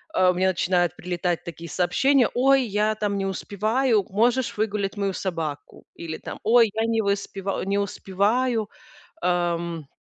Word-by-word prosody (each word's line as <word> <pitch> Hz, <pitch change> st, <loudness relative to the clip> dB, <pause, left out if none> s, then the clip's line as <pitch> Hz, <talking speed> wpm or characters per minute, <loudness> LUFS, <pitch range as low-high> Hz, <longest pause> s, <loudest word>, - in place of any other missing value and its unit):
э, 185 Hz, 0 st, +5 dB
мне 185 Hz, +1 st, +1 dB
начинают 175 Hz, -1 st, +1 dB
прилетать 175 Hz, -1 st, -2 dB
такие 170 Hz, 0 st, -8 dB
сообщения: 260 Hz, -, +2 dB
"Ой, 270 Hz, +1 st, +4 dB
я, 210 Hz, +1 st, 0 dB
там, 205 Hz, -2 st, -1 dB
не 195 Hz, -, -1 dB
успеваю, 215 Hz, +4 st, 0 dB
можешь 235 Hz, +4 st, +1 dB
выгулять 210 Hz, -2 st, -1 dB
мою 195 Hz, -1 st, -1 dB
собаку?" 165 Hz, -7 st, -5 dB
Или, 160 Hz, -1 st, -6 dB
там: -, -, -8 dB
"Ой, 230 Hz, -2 st, +5 dB
я 225 Hz, +1 st, 0 dB
не 225 Hz, -1 st, +1 dB
выспева 200 Hz, -1 st, -2 dB
э, -, -, -5 dB
не 200 Hz, +1 st, 0 dB
успеваю, 210 Hz, +4 st, 0 dB, 0.5 s
эм, 170 Hz, -3 st, -1 dB
200 Hz, 150 wpm, -24 LUFS, 180-220 Hz, 0.5 s, э